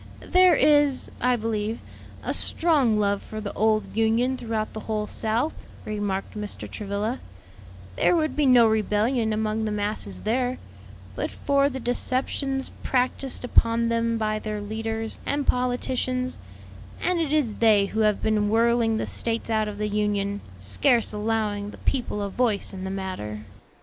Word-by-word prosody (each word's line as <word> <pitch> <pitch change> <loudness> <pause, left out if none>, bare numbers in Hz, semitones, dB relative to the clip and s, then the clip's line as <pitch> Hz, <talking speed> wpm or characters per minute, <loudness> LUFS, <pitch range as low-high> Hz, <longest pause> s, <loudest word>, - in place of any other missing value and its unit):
"There 365 -2 +6
is, 290 -3 +3
I 250 0 +3
believe, 220 -1 -2 0.4
a - - -1
strong 285 -10 +3
love 200 -1 +1
for 215 - -7
the 205 -1 -5
old 215 -1 +1
Union 225 +4 +2
throughout 225 -3 -3
the 220 - -5
whole 215 -1 -2
South," 225 +8 0 0.3
remarked 205 -2 -3
Mr. 210 -1 -5
Travilla; 210 +4 -3 0.8
"there - - +4
would 310 -2 0
be 295 -2 +2
no 245 -2 +7
rebellion 220 +2 +1
among 215 0 -1
the 215 - -1
masses 205 - -3
there, 250 +3 0 0.6
but - - -2
for 280 0 +1
the 265 -1 -5
deceptions 265 +2 -1
practised 255 0 -1
upon 230 -1 +3
them 230 0 +1
by 215 -1 -1
their 215 -1 -4
leaders 220 +1 -3
and 285 0 -1
politicians; 255 0 -1 0.6
and 360 -1 +2
it 315 -4 -1
is 290 -9 +1
they 215 -3 +5
who 215 +2 -4
have 215 -2 +2
been 210 -1 +2
whirling 230 0 +3
the - - -1
States 230 0 -3
out 215 -1 +1
of 210 -1 -6
the 210 0 -1
Union, 205 -1 -1 0.2
scarce 95 - +2
allowing 210 -1 -1
the - - -11
people 240 -6 -2
a 200 - -2
voice 220 -3 0
in 190 0 -6
the - - -3
matter." 185 - -5
220 Hz, 155 wpm, -25 LUFS, 210-250 Hz, 0.8 s, no